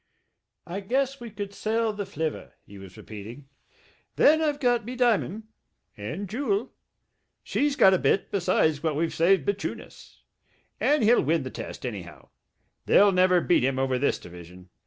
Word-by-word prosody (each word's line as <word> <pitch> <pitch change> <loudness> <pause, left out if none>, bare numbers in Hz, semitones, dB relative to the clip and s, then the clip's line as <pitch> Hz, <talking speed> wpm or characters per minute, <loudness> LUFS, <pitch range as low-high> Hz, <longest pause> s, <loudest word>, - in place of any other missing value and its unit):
"I 180 +3 -5
guess 270 +6 -1
we 235 - -8
could 205 -1 -7
sell 220 +1 -1
the 205 -2 -5
flivver 160 -4 -4
" - - -46
he 100 -1 -13
was 95 -1 -13
repeating. 115 +6 -10 0.7
"Then 315 +2 +5
I've 295 -2 0
got 245 -4 +1
me 245 +4 -7
diamond... 225 -4 +1 0.5
and 155 - -6
Jewel... 225 +1 -2 0.7
she's 290 -1 0
got 195 -8 +6
a 185 - +2
bit, 195 - +1
besides 170 -6 +1
what 160 -2 -1
we've 165 +2 -1
saved 170 -2 +3
bechune 200 0 -2
us. - - -16 0.6
And 295 -4 +2
he'll 230 +3 +5
win 155 +1 0
the 130 - -6
test, - - -8
anyhow... 95 -8 -8 0.6
they'll 205 0 +6
never 185 -1 +3
beat 175 - +2
him 130 0 0
over 130 -1 0
this 140 - +1
division 90 +1 -13
190 Hz, 165 wpm, -26 LUFS, 135-225 Hz, 0.7 s, got